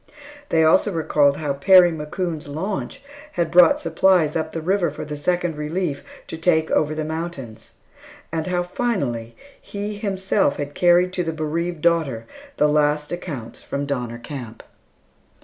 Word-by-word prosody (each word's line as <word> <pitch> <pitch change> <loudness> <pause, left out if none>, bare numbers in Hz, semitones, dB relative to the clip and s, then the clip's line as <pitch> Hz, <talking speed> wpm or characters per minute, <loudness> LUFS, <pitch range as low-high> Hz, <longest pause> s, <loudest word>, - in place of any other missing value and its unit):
They 160 -1 +3
also 175 +6 +4
recalled 150 -4 +2
how 150 -2 -2
Perry 180 +4 +6
McCoon's 160 0 -4
launch 185 - -4 0.3
had 170 -2 -1
brought 175 -1 +6
supplies 165 -2 +2
up 160 -1 -2
the 165 - -4
river 180 +1 +1
for 150 - -7
the 150 0 -5
Second 175 +2 -1
Relief 150 0 -3 0.2
to 160 - -8
take 160 -2 +2
over 155 0 +1
the 155 0 -3
mountains; 160 -8 -6 0.6
and 160 0 -2
how 180 -1 0
finally, 140 - -2 0.3
he 205 +1 -5
himself 195 -5 0
had 145 0 -5
carried 180 +2 +3
to 180 - -1
the 165 -1 -3
bereaved 160 +2 -3
daughter 150 -10 +1 0.3
the 150 - +4
last 150 0 +1
accounts 140 -10 -6
from 140 +1 -4
Donner 125 -4 -3
Camp. 120 -2 -8
160 Hz, 150 wpm, -22 LUFS, 145-175 Hz, 0.6 s, Perry